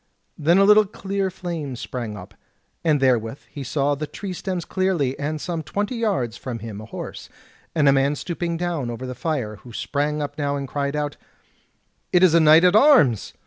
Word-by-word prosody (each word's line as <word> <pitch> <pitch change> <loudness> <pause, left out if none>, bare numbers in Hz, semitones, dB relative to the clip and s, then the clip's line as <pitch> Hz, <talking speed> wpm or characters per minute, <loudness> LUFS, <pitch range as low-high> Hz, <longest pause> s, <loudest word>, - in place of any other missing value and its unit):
Then 165 +4 +3
a 195 - +6
little 210 +1 +6
clear 195 -1 -2
flame 170 -7 -5
sprang 115 -3 -5
up, 95 +2 -11 0.5
and 155 -3 +3
therewith 125 -2 +1
he 140 - -6
saw 140 +2 0
the 150 +2 -4
tree 185 +6 -6
stems 180 -2 -4
clearly, 185 -9 0
and 150 +2 -2
some 170 0 -3
twenty 205 - -3
yards 190 - -1
from 125 -2 -5
him 110 -2 -7
a - - -9
horse, - - -8 0.5
and 150 -3 +3
a 140 - +7
man 140 +2 +2
stooping 170 +1 -3
down 165 -7 -2
over 120 +2 -5
the 125 - -5
fire, 125 -5 -3
who 120 - -14
sprang 150 +5 -2
up 145 0 -5
now 145 -1 0
and 140 -1 -4
cried 140 +1 -2
out: 145 -1 -2 0.9
"It 180 0 +4
is 180 -3 +6
a 170 - +6
knight 160 +1 +7
at 180 +2 +5
arms! 215 - +5
150 Hz, 195 wpm, -23 LUFS, 130-175 Hz, 0.9 s, a